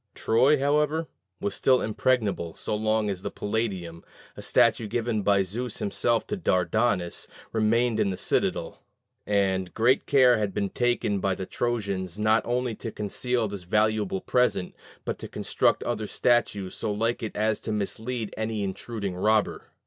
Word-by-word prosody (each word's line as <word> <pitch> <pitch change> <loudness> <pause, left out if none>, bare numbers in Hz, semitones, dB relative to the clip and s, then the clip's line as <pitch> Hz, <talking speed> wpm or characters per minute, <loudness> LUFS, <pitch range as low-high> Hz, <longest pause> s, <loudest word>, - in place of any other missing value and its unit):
Troy, 130 +7 +3
however, 150 +3 +1 0.3
was 100 - -2
still 130 +4 +3
impregnable 105 -7 0
so - - -4
long 110 0 +1
as 95 -3 -3
the - - -3
Palladium, 95 -6 -3 0.3
a - - -8
statue 110 - +3
given 115 0 -1
by 100 0 +3
Zeus 115 +6 -3
himself 115 +3 0
to 210 - -3
Dardanus, 95 - 0 0.3
remained 115 +1 +2
in 100 - +2
the 95 - -3
citadel; - - -1 0.5
and 95 -3 0
great 120 +4 +3
care 125 -4 +5
had 100 -2 -2
been 100 -1 0
taken 120 -5 0
by 95 -1 0
the 95 - -5
Trojans 100 -6 -2
not 110 +1 +3
only 125 0 0
to 115 +1 -6
conceal 115 +3 -1
this 100 -2 -6
valuable 105 +1 +1
present, 125 -7 +1 0.3
but - - -3
to - - -6
construct - - 0
other - - -2
statues 105 -6 +1
so 110 - -3
like 115 +3 -1
it 110 - -5
as 110 0 +1
to 110 - -5
mislead 110 +2 -3
any 110 -1 -2
intruding 100 0 -4
robber. 105 +3 +1
110 Hz, 155 wpm, -26 LUFS, 100-120 Hz, 0.5 s, care